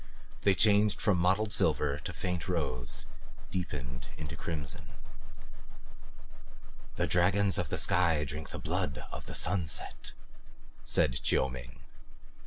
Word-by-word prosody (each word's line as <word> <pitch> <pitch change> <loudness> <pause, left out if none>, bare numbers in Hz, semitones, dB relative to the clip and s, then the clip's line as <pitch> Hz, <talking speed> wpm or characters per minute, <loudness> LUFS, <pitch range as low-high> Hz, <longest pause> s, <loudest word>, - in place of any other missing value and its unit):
They 100 -2 +4
changed 105 0 +4
from 100 -5 +2
mottled 95 +4 +2
silver 70 -2 +2
into 75 - -6
faint 90 0 -3
rose, 65 -9 -2 0.5
deepened 65 -9 -4
to 75 -2 -5
crimson. 70 -6 -5 2.0
"The - - +1
dragons 95 +1 +4
of - - -1
the - - -1
sky 85 -4 +3
drink 75 +1 -5
the - - -5
blood 65 - -2
of - - -7
the - - -6
sunset," 90 -5 -1 0.7
said 60 - +2
Chiu 65 - +3
Ming. 65 0 -9
80 Hz, 120 wpm, -31 LUFS, 65-95 Hz, 2.0 s, They